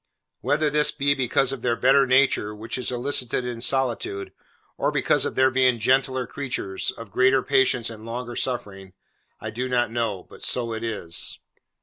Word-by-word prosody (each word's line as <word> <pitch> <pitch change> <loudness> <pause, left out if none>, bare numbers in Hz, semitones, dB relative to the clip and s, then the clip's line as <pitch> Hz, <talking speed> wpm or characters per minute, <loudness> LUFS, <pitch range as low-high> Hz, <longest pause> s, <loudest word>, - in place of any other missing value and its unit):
Whether 145 +3 +1
this 150 0 +4
be 140 -1 +1
because 135 0 +1
of 135 -3 -5
their 120 -1 +1
better 135 +2 +4
nature, 130 -5 +2
which 110 +2 -6
is 125 - -1
elicited 125 0 -1
in 120 -2 -5
solitude, 120 -7 -1 0.4
or - - 0
because - - +1
of - - -3
their 130 0 +4
being 130 -1 +3
gentler 130 +2 +1
creatures, 120 -8 -3
of 115 -4 -8
greater 130 0 +3
patience 130 -4 +2
and 110 -1 -10
longer 120 +1 -5
suffering, 95 -7 -3 0.5
I - - -6
do 125 +3 -3
not 120 -2 +1
know; 115 -6 -2
but - - -15
so 115 -2 -1
it 110 0 -5
is. 100 -7 -3
125 Hz, 170 wpm, -24 LUFS, 115-130 Hz, 0.5 s, this